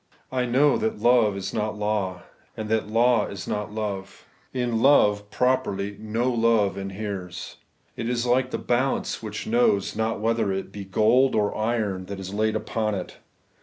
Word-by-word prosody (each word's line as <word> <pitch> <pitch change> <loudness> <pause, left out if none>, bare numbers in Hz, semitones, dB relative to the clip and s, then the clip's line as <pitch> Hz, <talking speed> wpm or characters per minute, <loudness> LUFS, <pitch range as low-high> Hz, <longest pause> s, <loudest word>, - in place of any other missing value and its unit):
I 125 -1 0
know 135 +4 +3
that 220 0 -1
love 120 -5 +4
is 100 0 -4
not 105 -1 -2
law, 105 -3 -1 0.3
and 110 -1 -4
that 110 -2 +1
law 115 +2 +3
is 95 -1 -7
not 105 0 -3
love. 100 -3 -5 0.3
In 120 -3 -1
law, 130 -7 +6
properly, 105 -6 0
no 115 +4 -1
love 115 -5 +2
inheres. 95 -2 -6 0.4
It 115 0 -3
is 120 -1 0
like 125 +1 +2
the - - -2
balance 130 +2 0
which 110 -1 -5
knows 110 -4 +2
not 110 0 -1
whether 110 -2 +1
it 95 0 -4
be 100 -1 -7
gold 110 +7 +3
or 105 -1 +1
iron 110 -4 -1
that 100 -1 -6
is 95 0 -6
laid 110 +1 +1
upon 110 -2 -1
it. 90 - -6
110 Hz, 165 wpm, -25 LUFS, 100-120 Hz, 0.4 s, law